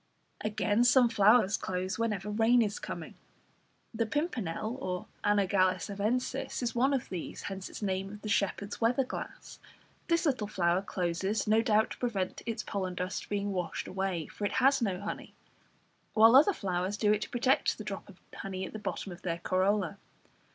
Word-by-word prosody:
Again, 215 +1 +1
some 245 0 +6
flowers 210 -1 +5
close 185 +3 -3
whenever 210 -3 -1
rain 230 +3 +4
is 205 -1 -3
coming. - - -6 0.8
The 225 0 0
pimpernel 220 - -3 0.2
(Anagallis 195 -1 +2
arvensis) 250 +6 -1
is 235 - -1
one 255 +3 +3
of 260 - -3
these, 180 -3 -6
hence 195 -1 -5
its - - -8
name 190 0 -1
of 210 0 -11
the - - -4
"Shepherd's 200 0 -1
Weather 245 +4 +3
glass." 255 - -7 0.5
This 335 0 +2
little 255 -8 +1
flower 180 -3 +1
closes, 190 +2 -1
no 220 +1 +4
doubt, 220 -2 +2
to - - -6
prevent 205 -7 -2
its 230 -1 -2
pollen 185 -2 -3
dust 180 +1 -4
being 205 0 -1
washed 180 -4 -3
away, 190 -4 -2
for 205 - -9
it 205 - 0
has 270 +1 +4
no 195 -5 0
honey; 205 +2 -6 0.8
while 225 +2 +7
other 300 +9 +7
flowers 190 - -2
do 210 -1 +3
it 210 - -1
to - - -4
protect 255 +2 +2
the 215 - -6
drop 200 -1 -6
of 190 - -15
honey 190 -1 -5
at - - -9
the 215 - -5
bottom 205 -2 -4
of 175 - -10
their 170 -2 -2
corolla. 190 +1 0
205 Hz, 175 wpm, -31 LUFS, 190-230 Hz, 0.8 s, while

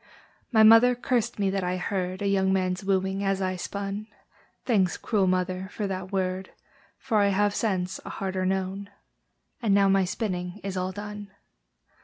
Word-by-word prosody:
My 220 -3 +6
mother 225 +3 +7
cursed 240 -1 -1
me 200 -2 +1
that 195 -1 -1
I 180 +1 -1
heard 185 +1 -3
A - - +1
young 190 -1 +2
man's 185 0 0
wooing 190 0 0
as 195 -1 0
I 185 -1 -1
spun: 200 +3 -5 0.6
Thanks, 195 -7 +2
cruel 205 -5 +1
mother, 185 +1 0
for 210 - -3
that 190 -1 -4
word, 185 -1 -2 0.5
For 230 -5 0
I 200 - +4
have, 200 +1 +2
since, 190 -4 -1
a - - -8
harder 190 -1 -3
known! 190 +1 -2 0.7
And 210 -4 +3
now 200 -1 +4
my 195 -1 +3
spinning 180 -1 -3
is 195 -1 -4
all 185 0 -1
done. 205 +1 -7
195 Hz, 170 wpm, -26 LUFS, 185-205 Hz, 0.7 s, mother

